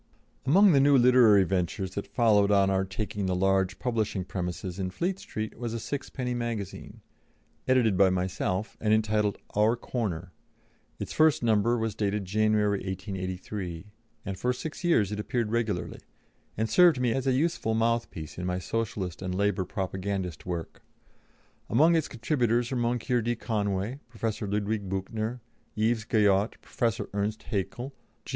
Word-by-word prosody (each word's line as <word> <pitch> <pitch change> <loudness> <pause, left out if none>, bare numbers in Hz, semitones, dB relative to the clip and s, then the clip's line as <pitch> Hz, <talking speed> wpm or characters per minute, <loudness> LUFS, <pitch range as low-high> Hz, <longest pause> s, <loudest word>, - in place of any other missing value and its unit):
Among 195 +7 +6
the 140 - +5
new 140 0 +5
literary 120 -5 +6
ventures 95 +1 -1
that 100 - -4
followed 105 -4 +3
on 100 -1 +4
our 95 0 +1
taking 100 0 -3
the 90 - 0
large 95 0 +1
publishing 110 -6 -1
premises 90 0 -4
in 95 -1 -1
Fleet 180 - -2
Street 110 0 -6
was 120 -2 -3
a - - -2
sixpenny 130 0 -4
magazine, 115 -5 -5 0.7
edited 125 -6 +3
by 95 -1 +6
myself, 95 +2 -2
and 110 0 +4
entitled 105 -2 +1 0.2
Our 105 +3 +4
Corner; 95 -8 -4 0.7
its - - -5
first 155 -4 +4
number 115 +1 +3
was 110 -2 -1
dated 100 -1 -1
January, 105 0 +2
1883, 95 -1 -5 0.3
and 95 -2 -5
for 125 - +1
six 155 +7 -7
years 110 - +3
it 105 - -3
appeared 110 0 -1
regularly, 110 -6 -1 0.6
and 110 +1 +1
served 175 -1 +5
me 125 -2 +2
as 135 0 -2
a - - +4
useful 135 -5 0
mouthpiece 115 -9 -1
in 90 - -3
my 90 0 -1
Socialist 95 -2 -3
and 90 -1 -3
Labour 100 -1 +1
propagandist 95 -3 -4
work. 85 -2 -5 0.9
Among 155 +9 +5
its 160 -2 +1
contributors 120 -2 0
were 130 - -1
Moncure 120 +1 0
D. 120 +2 -1
Conway, 105 +1 -2
Professor 110 -2 -3
Ludwig 105 0 -1
Büchner, 110 +5 -3 0.3
Yves 110 +1 +1
Guyot, 105 -2 +2
Professor 115 -4 -2
Ernst 105 +2 -2
Haeckel, 105 +6 -3 0.3
G. - - -12
105 Hz, 150 wpm, -28 LUFS, 95-120 Hz, 0.9 s, Among